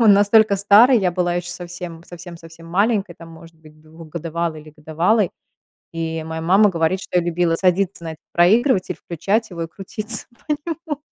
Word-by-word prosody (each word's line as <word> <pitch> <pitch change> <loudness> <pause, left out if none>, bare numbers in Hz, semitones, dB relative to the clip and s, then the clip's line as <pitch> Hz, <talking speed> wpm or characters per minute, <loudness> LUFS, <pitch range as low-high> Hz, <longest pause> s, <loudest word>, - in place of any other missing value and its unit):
он 220 -3 +7
настолько 205 0 +4
старый, 215 +6 +6
я 180 -3 0
была 175 -1 0
еще 175 0 -3
совсем 175 -1 -8
совсем 175 -1 -11
совсем 165 0 -14
маленькой, 195 +1 0
там, 165 0 -13
может 165 0 -14
быть, 155 -1 -19
двухгодовалой 160 +1 -5
или 155 - -15
годовалой, 170 +7 +1 0.6
и 165 -1 -3
моя 160 0 -5
мама 195 +5 +4
говорит, 170 +1 0
что 180 - -1
я 170 - 0
любила 170 -1 0
садиться 185 0 0
на - - -5
этот 160 - -12
проигрывать, 200 +4 +3
включать 200 +7 -2
его 170 -2 -5
и - - -3
крутиться 215 +6 -5
на 235 - -29 0.5
нём. 295 0 -3
175 Hz, 175 wpm, -20 LUFS, 165-200 Hz, 0.6 s, он